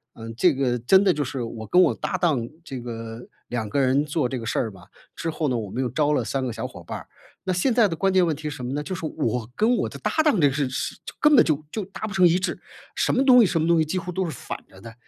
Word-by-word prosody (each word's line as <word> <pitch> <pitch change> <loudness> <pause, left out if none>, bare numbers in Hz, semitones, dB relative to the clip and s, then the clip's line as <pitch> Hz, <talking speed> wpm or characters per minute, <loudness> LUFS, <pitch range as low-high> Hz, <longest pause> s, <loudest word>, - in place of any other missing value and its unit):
嗯， 115 0 -8
这 170 +6 +4
个 130 -2 0
真 190 - +4
的 195 - +4
就 150 -3 -1
是 130 0 -4
我 115 -1 -6
跟 180 +10 +4
我 - - +3
搭 185 - -3
档 145 -10 +1 0.2
这 135 -6 -6
个 115 0 -7 0.2
2 115 -3 -3
个 140 - -1
人 135 +2 +3
做 150 -3 -1
这 130 - -3
个 115 - -6
事 - - -1
儿 115 - -1
吧， 95 -3 -15 0.3
之 165 - -3
后 155 0 -2
呢 125 -3 0
我 105 -4 -5
们 130 - -2
又 125 - -1
招 150 +4 +1
了 130 - +1
3 130 +5 -2
个 125 - -3
小 - - -4
伙 - - -12
伴 - - -6
儿。 - - -14 0.4
那 190 - 0
现 185 +8 +1
在 230 -3 +5
的 165 - -3
关 195 +3 +1
键 185 -1 +5
问 165 - +1
题 155 +2 -6
什 145 -3 -6
么 125 - -3
呢？ 145 - -1
就 185 - -5
是 165 - -5
我 120 -7 -2
跟 225 +4 +3
我 - - -1
的 - - -9
搭 - - -1
档 295 - +3
这 145 - +5
个 135 - -1
事 140 -2 0
事 130 - -3
就 - - -8
根 300 -1 +5
本 240 - +8
就 155 -2 0
就 215 - -3
达 195 +2 -7
不 210 - -5
成 190 -2 +4
一 170 +1 +3
致。 185 - -2 0.4
什 - - +1
么 265 - +2
东 250 -2 +8
西 - - +6
什 165 - 0
么 160 - +1
东 170 -1 +4
西 - - +4
几 155 +4 -3
乎 180 0 -4
都 190 - -1
是 170 - -3
反 125 - -6
着 95 - -16
的。 115 +3 -11
150 Hz, 330 characters per minute, -24 LUFS, 120-180 Hz, 0.4 s, 本